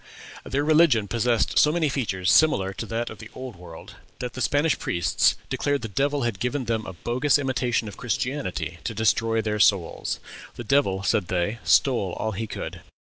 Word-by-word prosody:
Their 140 Hz, +2 st, -1 dB
religion 150 Hz, -9 st, +4 dB
possessed 115 Hz, +1 st, +1 dB
so 150 Hz, -, +5 dB
many 165 Hz, -1 st, +1 dB
features 105 Hz, -9 st, 0 dB
similar 100 Hz, -10 st, +4 dB
to 110 Hz, -, -6 dB
those 115 Hz, +2 st, -3 dB
of 110 Hz, -, -11 dB
the 110 Hz, -, -10 dB
Old 130 Hz, -3 st, -7 dB
World, 85 Hz, -2 st, -12 dB, 0.2 s
that 125 Hz, -1 st, -5 dB
the 130 Hz, -, -6 dB
Spanish 145 Hz, +4 st, +1 dB
priests 85 Hz, -2 st, +1 dB
declared 145 Hz, -2 st, -1 dB
the -, -, -2 dB
devil 140 Hz, +6 st, 0 dB
had 115 Hz, -5 st, -2 dB
given 125 Hz, +2 st, -2 dB
them 110 Hz, -1 st, -2 dB
a 95 Hz, -, -6 dB
bogus 125 Hz, -, +1 dB
imitation 125 Hz, -4 st, -1 dB
of 100 Hz, -, -9 dB
Christianity 115 Hz, -, -3 dB
to 115 Hz, -, -4 dB
destroy 110 Hz, +1 st, +1 dB
their 105 Hz, 0 st, -2 dB
souls. 95 Hz, -5 st, +1 dB, 0.4 s
"The 120 Hz, -, -6 dB
devil," 105 Hz, -7 st, +1 dB
said 100 Hz, -2 st, +1 dB
they, 95 Hz, +6 st, -1 dB
"stole 100 Hz, +1 st, +2 dB
all 110 Hz, -, -2 dB
he 110 Hz, +2 st, -4 dB
could." -, -, -6 dB
115 Hz, 185 wpm, -25 LUFS, 100-135 Hz, 0.4 s, so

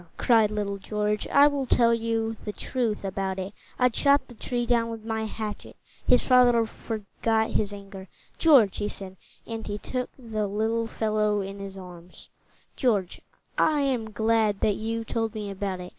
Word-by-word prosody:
cried 225 Hz, -3 st, +4 dB
little 205 Hz, -1 st, -3 dB
George. 210 Hz, +1 st, -1 dB
"I 280 Hz, +1 st, +6 dB
will 285 Hz, -2 st, +1 dB
tell 235 Hz, -1 st, +4 dB
you 225 Hz, -1 st, -1 dB
the 210 Hz, -, -3 dB
truth 225 Hz, -2 st, -2 dB
about 190 Hz, 0 st, -2 dB
it. 190 Hz, +2 st, -5 dB, 0.2 s
I 250 Hz, -, +4 dB
chopped 280 Hz, +4 st, +2 dB
the -, -, -10 dB
tree 240 Hz, +1 st, -2 dB
down 235 Hz, -1 st, +2 dB
with 225 Hz, -1 st, -7 dB
my 220 Hz, -1 st, -2 dB
hatchet." 215 Hz, -1 st, -6 dB, 0.3 s
His 250 Hz, -, +5 dB
father 245 Hz, -2 st, +5 dB
forgot 220 Hz, 0 st, -2 dB
his 205 Hz, -1 st, 0 dB
anger. 195 Hz, -1 st, -9 dB, 0.3 s
"George," 265 Hz, -, +5 dB
he 205 Hz, -, -1 dB
said, 190 Hz, -2 st, -8 dB, 0.3 s
and 225 Hz, -1 st, -6 dB
he 205 Hz, 0 st, -3 dB
took 250 Hz, +4 st, -4 dB
the 220 Hz, -5 st, -3 dB
little 220 Hz, +3 st, 0 dB
fellow 215 Hz, -2 st, 0 dB
in 195 Hz, +1 st, -6 dB
his 195 Hz, -1 st, -7 dB
arms, 180 Hz, -1 st, -12 dB, 0.5 s
"George, 210 Hz, -9 st, 0 dB, 0.4 s
I 305 Hz, -2 st, +3 dB
am 250 Hz, -5 st, 0 dB
glad 220 Hz, -1 st, +1 dB
that 210 Hz, -, +2 dB
you 225 Hz, +1 st, -3 dB
told 225 Hz, 0 st, -2 dB
me 210 Hz, -2 st, -4 dB
about 195 Hz, -1 st, -3 dB
it. 180 Hz, 0 st, -7 dB
220 Hz, 175 wpm, -26 LUFS, 205-230 Hz, 0.5 s, I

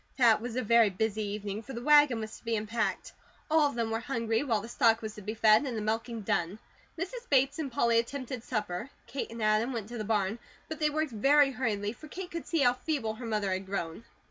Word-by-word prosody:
That 235 Hz, -5 st, +5 dB
was 240 Hz, 0 st, -5 dB
a 255 Hz, -, 0 dB
very 230 Hz, -1 st, +5 dB
busy 215 Hz, +3 st, -1 dB
evening, 205 Hz, 0 st, -4 dB
for 265 Hz, +4 st, -9 dB
the 235 Hz, -, -6 dB
wagon 295 Hz, -4 st, +6 dB
was 220 Hz, 0 st, -6 dB
to -, -, -28 dB
be 230 Hz, -1 st, -1 dB
unpacked; 215 Hz, +2 st, -2 dB, 0.4 s
all 310 Hz, -2 st, +5 dB
of 280 Hz, -, -8 dB
them 230 Hz, -1 st, -1 dB
were 225 Hz, -, 0 dB
hungry, 230 Hz, -3 st, -1 dB
while 230 Hz, -7 st, +1 dB
the 225 Hz, -, -8 dB
stock 230 Hz, -1 st, +3 dB
was 215 Hz, -1 st, -4 dB
to 210 Hz, -, -10 dB
be 215 Hz, +3 st, -5 dB
fed, 215 Hz, +2 st, +5 dB
and 255 Hz, -5 st, -3 dB
the -, -, -2 dB
milking 225 Hz, +1 st, -2 dB
done. 175 Hz, -1 st, -1 dB, 0.4 s
Mrs. 470 Hz, +9 st, -6 dB
Bates 275 Hz, +2 st, +3 dB
and 285 Hz, -4 st, -3 dB
Polly 235 Hz, -1 st, +3 dB
attempted 255 Hz, 0 st, -4 dB
supper; 210 Hz, -1 st, -3 dB, 0.2 s
Kate 275 Hz, -, -5 dB
and 230 Hz, -1 st, -6 dB
Adam 215 Hz, +4 st, +2 dB
went 225 Hz, -3 st, -5 dB
to 240 Hz, -1 st, -6 dB
the -, -, -2 dB
barn; 210 Hz, 0 st, 0 dB, 0.3 s
but 315 Hz, -, -6 dB
they 300 Hz, -1 st, +2 dB
worked 310 Hz, -1 st, -1 dB
very 275 Hz, +6 st, +4 dB
hurriedly, 215 Hz, -5 st, -2 dB
for 310 Hz, -, -12 dB
Kate 360 Hz, +3 st, -7 dB
could 335 Hz, -, -6 dB
see 330 Hz, -3 st, +1 dB
how 245 Hz, -2 st, +5 dB
feeble 250 Hz, -4 st, -2 dB
her 235 Hz, +2 st, -7 dB
mother 210 Hz, -3 st, -1 dB
had 190 Hz, +1 st, -3 dB
grown. 190 Hz, 0 st, -4 dB
230 Hz, 240 wpm, -30 LUFS, 215-270 Hz, 0.4 s, wagon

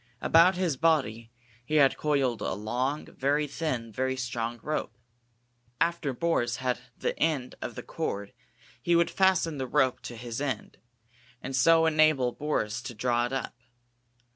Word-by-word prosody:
About 170 Hz, +6 st, +5 dB
his 175 Hz, -6 st, 0 dB
body 120 Hz, -9 st, +1 dB, 0.3 s
he 155 Hz, +5 st, -3 dB
had 140 Hz, -3 st, +5 dB
coiled 135 Hz, -7 st, 0 dB
a -, -, -1 dB
long, 125 Hz, +8 st, -2 dB
very 145 Hz, +3 st, 0 dB
thin, 130 Hz, -6 st, -3 dB
very 130 Hz, +4 st, -1 dB
strong 120 Hz, -2 st, -3 dB
rope. 155 Hz, -3 st, -3 dB, 0.8 s
After 170 Hz, -4 st, 0 dB
Boris 120 Hz, -4 st, 0 dB
had 125 Hz, 0 st, -1 dB, 0.2 s
the -, -, -2 dB
end 150 Hz, -6 st, 0 dB
of -, -, -5 dB
the -, -, -7 dB
cord 100 Hz, 0 st, -4 dB, 0.5 s
he 175 Hz, -, +2 dB
would 170 Hz, 0 st, +3 dB
fasten 180 Hz, -6 st, +2 dB
the 130 Hz, -, -2 dB
rope 130 Hz, -1 st, +2 dB
to 120 Hz, -, -8 dB
his 120 Hz, +2 st, -6 dB
end, 130 Hz, -7 st, -4 dB, 0.6 s
and 135 Hz, +1 st, -5 dB
so 165 Hz, +5 st, +5 dB
enable 155 Hz, -5 st, +3 dB
Boris 120 Hz, -6 st, -2 dB
to 120 Hz, -1 st, -7 dB
draw 120 Hz, +2 st, +1 dB
it -, -, -11 dB
up. 135 Hz, -1 st, -3 dB
135 Hz, 155 wpm, -28 LUFS, 120-155 Hz, 0.8 s, About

